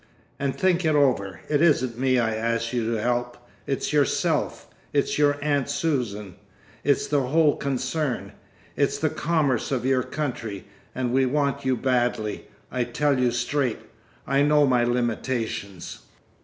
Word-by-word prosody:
And 140 -1 -1
think 185 -1 +2
it 155 -2 +2
over. 100 - +1
It 150 -1 +1
isn't 130 -8 +2
me 130 -1 +2
I 115 -2 +1
ask 115 +1 -1
you 115 -2 0
to 115 - -1
help. 120 +1 -1 0.3
It's 135 +2 -2
yourself. 145 -2 +1 0.3
It's 145 0 +1
your 145 -1 +3
aunt 145 -2 +1
Susan. 120 - -2 0.5
It's 140 -2 +2
the 145 0 +1
whole 155 +1 +3
concern. 135 +1 -2 0.4
It's - - +1
the - - 0
commerce 150 -7 0
of 130 -2 -1
your 130 -1 +3
country. 120 -9 -4 0.3
And 125 -1 -1
we 130 0 +3
want 140 0 0
you 130 -1 +2
badly. 120 -4 -1 0.2
I 125 -1 0
tell 135 +3 0
you 125 -1 +3
straight, 120 +1 -1 0.5
I 135 +1 +2
know 150 0 +4
my 125 -3 +3
limitations. 120 -5 -2
130 Hz, 150 wpm, -25 LUFS, 120-145 Hz, 0.5 s, know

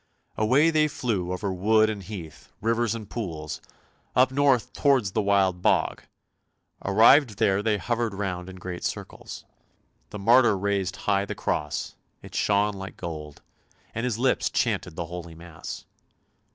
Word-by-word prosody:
Away 135 +9 +4
they 155 -1 +3
flew 105 -11 -2
over 95 +1 -2
wood 110 +4 +3
and 105 -2 -3
heath, 90 -6 -9
rivers 115 0 +1
and 110 -3 -7
pools, 80 -9 -5 0.5
up 130 +1 +5
north 135 -3 +2
towards 130 -9 +2
the 110 - +1
Wild 95 -3 +2
Bog; - - +2 0.8
arrived 110 +3 +5
here 95 0 +3
they 105 -1 +1
hovered 115 +2 -1
round 95 -2 -3
in 95 - -9
great 90 -1 -7
circles. - - -6 0.6
The - - -7
martyr 115 +1 +5
raised 100 0 -1
high 100 -1 +2
the - - -5
cross, 75 -1 -2 0.3
it - - -12
shone 105 0 +2
like 95 -1 -8
gold, 75 -3 -7 0.5
and 115 - -3
his 125 -3 -1
lips 125 +2 +1
chanted - - -1
the 85 - -3
holy 85 -1 -8
mass. 85 -1 -9
100 Hz, 150 wpm, -26 LUFS, 90-115 Hz, 0.8 s, up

